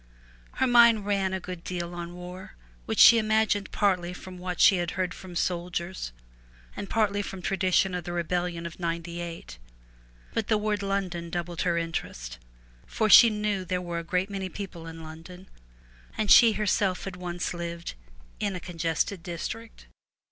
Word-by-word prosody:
Her 260 - +1
mind 235 -4 +6
ran 195 -2 +1
a 190 - -2
good 180 -1 -8
deal 175 -1 -4
on 175 0 -6
war, 180 +1 -9 0.3
which - - -2
she 235 - +9
imagined 215 -2 +1
partly 180 -3 +1
from 180 0 -10
what 180 0 -4
she 195 - +7
had 175 -1 -1
heard 185 -1 -1
from 185 -2 -11
soldiers, 175 - -2 0.6
and 200 - -6
partly 205 -2 +1
from 190 -2 -7
tradition 190 0 +2
of 180 -1 -3
the 175 - -5
rebellion 175 0 -2
of 170 +1 -7
'98, 170 - -5 0.7
but 225 -2 -1
the 215 - +3
word 210 -1 -1
London 190 -4 -2
doubled 175 0 -3
her 175 -2 +1
interest, 60 - -4 0.5
for 215 -2 0
she 235 - +10
knew 210 -2 -1
there 180 0 -2
were 175 -1 -4
a - - -6
great 185 +4 -1
many 190 -1 -3
people 175 -4 -7
in 165 0 -9
London, 165 +4 -11 0.7
and 215 -2 +1
she 230 -2 +8
herself 205 -3 0
had 195 -2 -5
once 175 -1 -4
lived 170 0 -5 0.5
in 200 -2 -1
'a - - -4
congested 165 +1 -2
district.' 205 +6 -6
180 Hz, 165 wpm, -27 LUFS, 170-200 Hz, 0.7 s, she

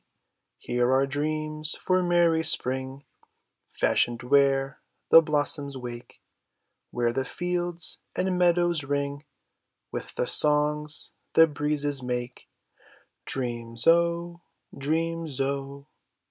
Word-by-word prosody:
Here 125 +1 0
are 135 +1 +3
dreams 155 +2 -2
for 185 0 +1
merry 170 -2 +2
spring, 130 -2 -1 0.6
Fashioned 120 0 0
where 135 +1 +2 0.3
the 165 - +9
blossoms 145 -2 0
wake; 120 -1 -9 0.7
Where 120 -1 -1
the 135 - -1
fields 175 +3 -2 0.2
and 185 0 0
meadows 175 -2 +2
ring 140 +1 -3 0.7
With - - -6
the - - 0
songs 150 0 +1 0.2
the 165 - +8
breezes 145 -2 -1
make; 125 -1 -5 0.8
Dreams, 120 -2 -2
0! 170 +1 +2 0.3
Dreams, 165 +2 -2
0! 140 +1 -3
145 Hz, 100 wpm, -26 LUFS, 135-165 Hz, 0.8 s, the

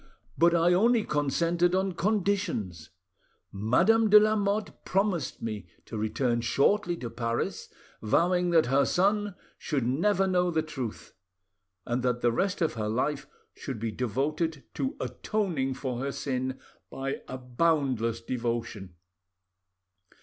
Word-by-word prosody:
But 170 +1 +4
I 170 +1 +4
only 225 +4 +4
consented 170 +4 +1
on 190 0 +1
conditions: 180 - -1 0.6
Madame 175 - +3
de 210 +1 +9
Lamotte 210 -1 0
promised 195 -6 -1
me 105 -5 -4 0.2
to - - -8
return 120 +3 0
shortly 175 - +2
to 120 - -5
Paris, 115 0 -3 0.3
vowing 175 +10 +2
that 165 -2 +4
her 135 +3 +3
son 205 +4 +1 0.2
should 140 -6 -1
never 195 +10 +2
know 180 -1 +2
the 160 -2 0
truth, 130 -8 -6 0.7
and 120 +1 -1
that 125 -1 0
the 120 - +3
rest 185 +8 0
of 160 - 0
her 110 -2 -3
life 140 +5 -1 0.3
should 135 -4 -6
be 115 0 -2
devoted 140 +7 -2
to 270 +3 -2
atoning 165 -12 -2
for 130 -3 -4
her 140 +2 -2
sin 130 -1 -3 0.3
by 135 +1 -4
a 130 - -5
boundless 125 -3 0
devotion. 115 -6 -4
145 Hz, 130 wpm, -28 LUFS, 120-185 Hz, 0.7 s, de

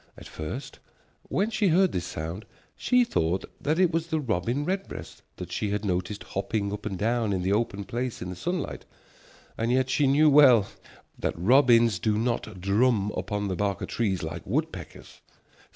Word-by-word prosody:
At - - -11
first 80 - -7 0.5
when 210 +4 0
she 215 -2 +1
heard 185 +2 +4
this 90 0 -3
sound 85 +5 -5 0.3
she 250 0 +3
thought 90 - 0 0.2
that 155 +2 0
it 180 -2 +4
was 165 0 -1
the 160 -2 -1
robin 120 - -1
redbreast 190 +3 -5
that - - -8
she 105 - -2
had 105 +1 -2
noticed 95 +2 -2
hopping 100 +1 -2
up 105 - -5
and 95 -3 -4
down 115 +1 0
in 95 -2 -1
the 95 +2 +1
open 100 -2 -1
place 120 +5 -4
in 90 - -5
the - - -6
sunlight, 175 - -3 0.8
and 115 +1 0
yet 130 0 +1
she 145 0 +3
knew 145 +3 +5
well 135 -8 +7 0.5
that - - -2
robins 115 0 +4
do 105 +3 +1
not 110 -3 -2
drum 105 +2 +2
upon 105 -1 -2
the 95 - -2
bark 100 0 -1
of - - -5
trees 100 -6 -1
like - - -5
woodpeckers. - - -5
115 Hz, 180 wpm, -27 LUFS, 100-140 Hz, 0.8 s, well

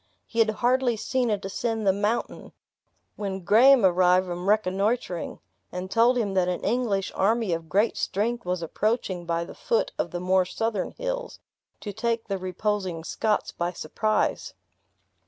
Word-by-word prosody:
He 230 - -5
had 225 -1 +5
hardly 245 +2 +1
seen 250 +2 0
it 205 -3 -1
ascend 220 +2 -2
the 190 - +4
mountain, 210 +4 -2 0.6
when 195 -2 -4
Graham 240 +4 +6
arrived 180 0 +4
from 180 +1 -3
reconnoitering, 205 -1 0 0.3
and 180 +1 -5
told 240 +2 +4
him 210 -5 0
that 185 -2 +2
an 180 -1 -2
English 225 -6 0
army 215 -1 +1
of 165 -1 -4
great 205 +7 +2
strength 235 +4 -1
was 180 -3 -2
approaching 190 -1 -1
by 170 0 -1
the - - -10
foot 475 0 0
of - - 0
the 175 - -4
more 185 +1 +3
southern 210 +1 -2
hills, - - -4 0.4
to 205 - -6
take 230 +2 -1
the 195 -1 -2
reposing 185 -2 -2
Scots 210 +5 -1
by 175 +1 -3
surprise. 215 +7 -1
205 Hz, 155 wpm, -26 LUFS, 185-230 Hz, 0.6 s, Graham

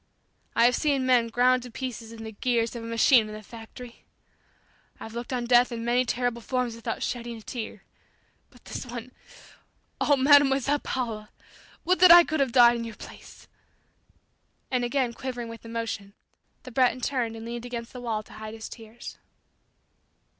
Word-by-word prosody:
I 230 - +5
have 245 0 +4
seen 275 -2 +1
men 245 -2 +4
ground 250 +2 +3
to 250 - -9
pieces 235 -2 -6
in 225 -1 -9
the 220 - -7
gears 235 +1 -1
of 235 - -6
a - - -6
machine 230 0 +4
in 215 - -8
the 215 - -10
factory. 230 +2 -12 1.0
I've 225 - -9
looked 235 +2 -6
on 245 -2 -2
death 245 +1 +4
in 230 -1 -5
many 245 +2 +2
terrible 245 -1 -1
forms 250 -1 -2
without 230 - -4
shedding 235 -1 -4
a - - -12
tear 220 -4 -7 0.7
but - - -22
this - - -6
one! 245 0 -8 0.9
oh, 290 -1 +4
Mademoiselle 280 0 +4
Paula! 225 -6 -4 0.6
Would 365 +1 +2
that 365 -1 +8
I 345 0 +10
could 315 -2 -2
have 270 -3 +1
died 240 -1 +6
in 230 - -4
your 230 -2 -7
place!" - - -13 1.2
And 250 -1 +1
again 245 -1 0
quivering 245 -2 -5
with 230 0 -10
emotion, 225 -3 -5 0.5
the 255 - -10
Breton 255 +1 +2
turned 240 -4 -1
and 225 0 -8
leaned 235 +1 -6
against 235 -1 -6
the 250 - -8
wall 225 -3 -2
to - - -16
hide 215 0 -8
his 220 - -8
tears. 225 +1 -11
240 Hz, 175 wpm, -26 LUFS, 230-255 Hz, 1.2 s, I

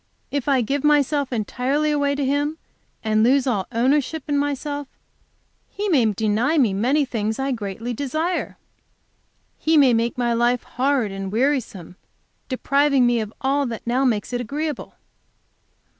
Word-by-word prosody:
If 285 -2 -2
I 270 -3 +3
give 275 +4 -1
myself 290 -2 +2
entirely 260 +6 0
away 285 -1 +1
in - - -4
Him 285 +2 0 0.5
and 215 -1 +2
lose 260 +4 +4
all 210 -8 -1
ownership 275 +6 +1
in 290 - 0
myself, 285 0 -2 0.8
He 410 +1 -3
may 275 -10 +4
deny 220 - +1
me 235 -9 +3
many 260 +9 +2
things 220 -3 -2
I 270 0 -1
greatly 225 +1 -4
desire. 310 +8 -2 1.0
He 320 0 +2
may 270 -4 +6
make 230 +1 0
my 240 -1 +1
life 240 +1 +1
hard 255 -4 0
and 195 0 -5
wearisome, 230 - -1 0.5
depriving 275 0 +2
me 240 -1 +2
of 215 -2 -4
all 275 +1 +1
that 230 -2 -6
now 245 +3 +1
makes 235 -3 0
it 245 - -1
agreeable.' 295 +5 -4
260 Hz, 150 wpm, -22 LUFS, 230-285 Hz, 1.0 s, may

